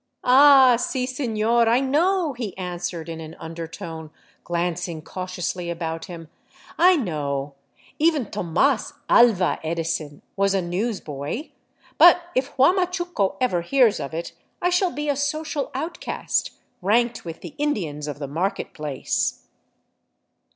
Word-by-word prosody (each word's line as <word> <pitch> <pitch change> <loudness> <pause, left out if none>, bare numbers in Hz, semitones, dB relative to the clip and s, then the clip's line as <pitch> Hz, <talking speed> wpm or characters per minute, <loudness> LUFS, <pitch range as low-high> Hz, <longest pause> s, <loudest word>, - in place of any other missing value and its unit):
" - - -51
Ah, 265 -1 +7
si, 250 +1 -1
seiior, 235 -3 +1
I 235 +2 +4
know," 320 +4 +1
he 230 -7 -6
answered 175 -2 -4
in 165 -1 -6
an 160 +1 -9
undertone, 165 -1 -7 0.3
glancing 175 -1 -2
cautiously 185 0 -4
about 165 -1 -4
him, 165 -2 -9 0.3
" - - -22
I - - +4
know; 145 - -2 0.5
even 305 -7 +2
Tomas 210 - +1
Aha 220 -7 +4
Edison 160 -2 -3
was 195 0 +2
a 190 - +2
news 195 +5 -2
boy. 145 - -5 0.5
But 350 0 +8
if 260 +2 0
Huamachuco 350 - +2
ever 210 -9 +1
hears 240 +4 +3
of 140 - -5
it 170 - -5 0.3
I 355 0 +1
shall 360 0 +2
be 295 +3 -4
a 285 - +1
social 290 0 -2
outcast, 320 +6 -2 0.3
ranked 235 +5 +1
with 165 -1 -8
the - - -9
Indians 165 - -2
of 145 - -5
the 145 -1 -5
market 170 +8 -2
place." 150 -4 -2
195 Hz, 135 wpm, -23 LUFS, 165-270 Hz, 0.5 s, But